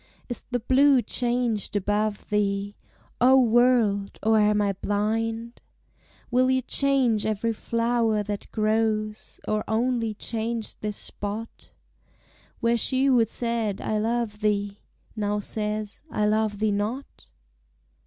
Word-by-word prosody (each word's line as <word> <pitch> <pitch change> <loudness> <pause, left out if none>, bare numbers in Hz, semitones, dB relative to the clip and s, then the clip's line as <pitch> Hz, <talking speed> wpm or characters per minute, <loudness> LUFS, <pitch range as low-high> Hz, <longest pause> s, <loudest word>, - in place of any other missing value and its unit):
Is 240 - -4
the 245 -1 -1
blue 265 +2 +4
changed 240 -3 -1
above 205 +1 -1
thee, 200 -1 0 0.5
O 260 +2 +7
world! 235 -4 +3
or 220 0 +4
am 210 0 +3
I 200 -1 +1
blind? 225 +4 -2 0.7
Will 255 +1 +3
you 260 0 +2
change 260 -5 +2
every 220 +1 -1
flower 230 -1 0
that 205 0 -6
grows, 215 -1 -1
Or 215 0 0
only 230 -1 0
change 225 +1 -3
this 210 -1 -4
spot, 210 +3 -6 0.9
Where 235 0 +2
she 260 +4 +1
who 255 -4 +5
said, 230 -3 -2
I 215 - -1
love 225 -1 -1
thee, 205 -1 -1 0.4
Now 210 -1 -1
says, 210 0 -3
I 210 - 0
love 215 0 +1
thee 215 0 +1
not? 215 +7 -4
220 Hz, 125 wpm, -25 LUFS, 210-235 Hz, 0.9 s, O